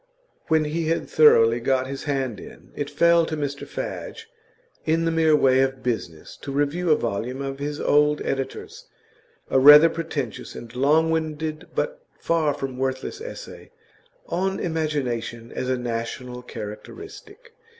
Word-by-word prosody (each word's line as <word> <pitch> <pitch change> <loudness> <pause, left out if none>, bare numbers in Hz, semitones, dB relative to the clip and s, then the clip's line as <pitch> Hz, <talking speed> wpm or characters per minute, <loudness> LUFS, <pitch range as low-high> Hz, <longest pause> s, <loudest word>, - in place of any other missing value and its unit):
When 160 -1 +3
he 160 +2 -2
had 165 +1 -1
thoroughly 115 -6 +5
got 130 +1 +1
his 135 +1 -6
hand 130 -7 -2
in, - - -13
it 145 -1 -3
fell 170 +3 +4
to 155 - -3
Mr 145 -1 -4
Fadge, 450 0 -6 0.6
in 165 +1 +1
the 165 - +1
mere 160 -1 +4
way 130 -3 +4
of 135 -1 -1
business, 90 -10 -4
to 140 - -7
review 145 +5 0
a 155 - +6
volume 120 +3 -3
of 135 0 -4
his 145 +1 -4
old 150 0 +3
editor's, 135 -1 -4 0.6
a 130 - +4
rather 150 +4 +9
pretentious 140 -7 -5
and 115 0 -10
longwinded 155 +3 0
but - - -2 0.2
far 155 -4 +1
from 135 -3 -5
worthless 130 - -3
essay - - -9 0.6
'On 190 +1 -1
Imagination 130 -8 -3
as 130 - -3
a 130 - +1
National 125 +1 -4
Characteristic. 405 - -10
145 Hz, 145 wpm, -24 LUFS, 130-160 Hz, 0.6 s, rather